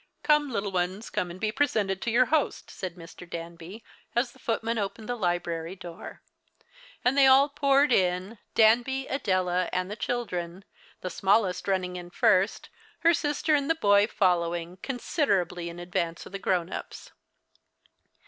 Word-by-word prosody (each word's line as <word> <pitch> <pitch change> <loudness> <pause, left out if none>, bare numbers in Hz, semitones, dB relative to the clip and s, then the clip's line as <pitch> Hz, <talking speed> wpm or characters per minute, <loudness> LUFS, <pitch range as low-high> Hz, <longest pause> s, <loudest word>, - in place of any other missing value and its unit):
"Come, 300 -1 +3
little 200 -5 -2
ones, 185 +4 -2
come 180 - -1
and 175 +2 -9
be 215 +1 0
presented 215 -8 0
to - - -1
your 245 +2 +4
host," 310 -3 0
said 185 -3 -6
Mr. 170 0 -12
Danby, 170 +5 -8 0.3
as 240 +1 +1
the - - -20
footman 230 0 -1
opened 205 +2 -4
the 245 - -1
library 175 -3 -2
door; 175 -3 -10 0.8
and 250 +2 +3
they 275 -1 +6
all 270 +2 +6
poured 280 0 +3
in, 185 +2 +1 0.2
Danby, 245 +4 +4
Adela, 185 -9 0
and 185 +2 -2
the - - -4
children, 190 -7 -4 0.4
the 185 - -4
smallest 195 -1 +1
running 185 -2 -1
in 175 0 -8
first, 185 +3 +2 0.3
her 335 0 +5
sister 295 0 0
and 285 0 +2
the 325 - +3
boy 205 -6 +4
following, 175 -4 0
considerably 195 - -1
in 170 - -9
advance 175 -1 -3
of - - -11
the 195 - -5
grown 185 -2 0
ups. - - -8
195 Hz, 160 wpm, -27 LUFS, 180-245 Hz, 0.8 s, they